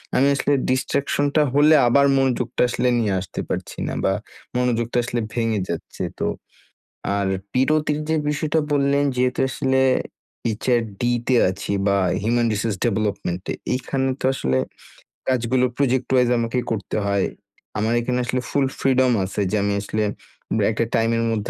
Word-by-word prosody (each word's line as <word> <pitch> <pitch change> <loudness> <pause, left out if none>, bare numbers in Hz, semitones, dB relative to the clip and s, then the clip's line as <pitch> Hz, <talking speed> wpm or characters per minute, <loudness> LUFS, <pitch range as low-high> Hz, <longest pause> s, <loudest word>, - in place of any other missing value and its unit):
আমি 135 - +4
আসলে 140 +1 +1 0.2
ডিস্ট্রাকশনটা 140 +3 +1
হলে 150 +2 +6
আবার 140 +4 +5
মনোযোগটা 125 -2 0
আসলে 125 - 0
নিয়ে 105 -4 +1
আসতে 95 - -7
পারছি - - -4
না। - - -3
বা 95 - +2 0.4
মনোযোগটা 120 -1 0
আসলে 120 0 -2
ভেঙে 115 -3 0
যাচ্ছে। 85 - -5 0.2
তো - - 0 0.9
আর 100 -1 0 0.3
বিরতির 150 +3 +2
যে 160 - +2
বিষয়টা 150 +2 0
বললেন 140 0 +2
যেহেতু 125 0 0
আসলে 130 0 +1 0.8
HRD 115 -6 0 0.3
তে 130 - +3
আছি 100 +2 -4 0.2
বা 100 - +3 0.3
হিউম্যান 120 +1 +2
রিসোর্স 105 0 -1
ডেভেলপমেন্টে, 100 -5 -1 0.2
এইখানে 135 +1 -1
তো - - -1
আসলে 65 - 0 0.7
কাজগুলো 125 0 +2
প্রজেক্ট 130 -2 +1
ওয়াইজ 125 -1 +4
আমাকে 115 +2 0
করতে 105 -4 -3
হয়। 100 -1 +1 0.5
আমার 110 +2 +1
এখানে 125 +1 -1
আসলে 125 +1 -1
ফুল 140 -1 +2
ফ্রিডম 130 -1 +3
আছে 100 +2 -3
যে 110 - +1
আমি 100 0 +1
আসলে 110 +1 -2 0.5
উম - - +1
একটা 115 +2 0
টাইমের 115 0 +2
মধ্যে 105 -2 -2
120 Hz, 150 wpm, -22 LUFS, 110-130 Hz, 0.9 s, হলে